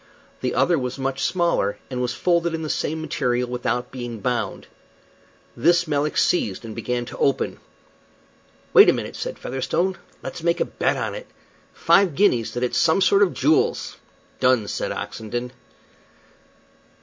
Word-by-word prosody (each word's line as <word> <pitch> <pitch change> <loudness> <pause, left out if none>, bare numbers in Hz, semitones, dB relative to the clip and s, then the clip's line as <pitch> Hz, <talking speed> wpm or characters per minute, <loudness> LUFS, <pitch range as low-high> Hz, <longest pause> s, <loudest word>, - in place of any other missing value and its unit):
The 125 - -1
other 155 +5 +3
was 125 0 -4
much 135 0 -2
smaller, 170 - +1
and, 125 -1 -2
was 125 -1 -1
folded 170 -2 +1
in 160 - -5
the 155 - -2
same 160 +1 -2
material 125 -5 -1
without 125 0 -2
being 120 -3 -6
bound. 125 +2 -2 0.9
This 170 +6 +3
Melick 150 0 0
seized 110 - +1
and 110 - -7
began 120 +2 -3
to - - -9
open. 135 - 0 1.1
"Wait - - +9
a - - +5
minute," - - -5
said - - -5
Featherstone. 170 +8 -2 0.2
"Let's - - -6
make 170 +1 +1
a - - +2
bet - - -1
on - - -2
it. - - -8 0.5
Five 190 -6 +3
guineas 125 - +2
that 120 - -2
it's 125 - +1
some 165 +2 +3
sort 195 +1 +4
of 195 -3 +3
jewels!" 150 +4 +1 0.4
"Done," 130 -5 +3
said - - -3
Oxenden. 120 +3 -5
135 Hz, 155 wpm, -23 LUFS, 125-170 Hz, 1.1 s, Wait